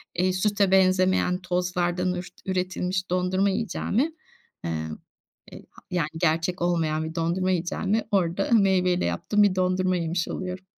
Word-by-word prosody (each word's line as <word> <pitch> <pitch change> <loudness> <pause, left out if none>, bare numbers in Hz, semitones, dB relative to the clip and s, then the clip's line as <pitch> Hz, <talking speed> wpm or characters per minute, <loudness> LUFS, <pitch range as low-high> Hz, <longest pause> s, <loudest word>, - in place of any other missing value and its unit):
eee, 185 +1 +1
süte 200 0 +1
benzemeyen 185 -1 +3
tozlardan 180 0 -1
ürt 180 0 -7
üretilmiş 185 0 -2
dondurma 185 +2 +1
yiyeceğime, 230 +7 -1 0.5
emm, 80 -1 -3 0.6
e - - -8
ha - - -17
yani, 175 -4 0
gerçek 165 +2 0
olmayan 165 -3 0
bir 160 +1 -7
dondurma 175 +3 0
yiyeceğime 185 +5 -1
orada 190 -1 +1
meyveyle 190 -5 +3
yaptığım 85 - +1
bir 200 -2 +3
dondurma 185 0 +1
yemiş 170 0 -1
oluyorum. 185 0 -5
180 Hz, 135 wpm, -25 LUFS, 175-190 Hz, 0.6 s, benzemeyen